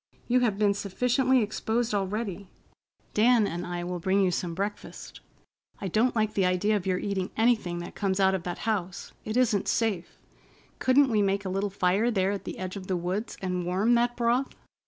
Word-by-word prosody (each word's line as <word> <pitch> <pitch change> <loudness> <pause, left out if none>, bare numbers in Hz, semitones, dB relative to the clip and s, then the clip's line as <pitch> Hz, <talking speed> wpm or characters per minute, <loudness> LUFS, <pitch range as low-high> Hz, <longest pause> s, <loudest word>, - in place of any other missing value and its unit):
You 250 +1 +3
have 225 -5 +1
been 205 -1 +3
sufficiently 250 +6 +1
exposed 220 +2 -1
already. 200 -1 -3 0.6
Dan 230 0 +4
and 175 -2 -4
I 175 0 -4
will 180 0 -4
bring 190 +3 +1
you 190 -2 +3
some 170 -1 -3
breakfast. 200 +3 -5 0.6
I 195 - -3
don't 230 +7 +2
like 215 -1 +1
the 195 - +1
idea 185 +4 +2
of 195 -2 -2
your 185 -1 +1
eating 190 -1 -2
anything 220 -7 +2
that 175 - -8
comes 195 -1 -1
out 190 0 +4
of 190 - -1
that 175 0 -5
house. 190 -5 -3
It 220 +2 -2
isn't 225 -6 +2
safe. 210 -7 -1 0.6
Couldn't 265 0 +4
we 215 -2 +3
make 200 0 0
a - - -2
little 195 +2 -1
fire 195 +4 +1
there 195 -4 +1
at 200 - -5
the - - -6
edge 185 0 -5
of 190 -2 -7
the 185 - 0
woods 185 +6 -3
and 180 -1 -1
warm 190 +7 +2
that 240 0 +2
broth? 240 +3 +1
200 Hz, 200 wpm, -27 LUFS, 185-225 Hz, 0.6 s, Dan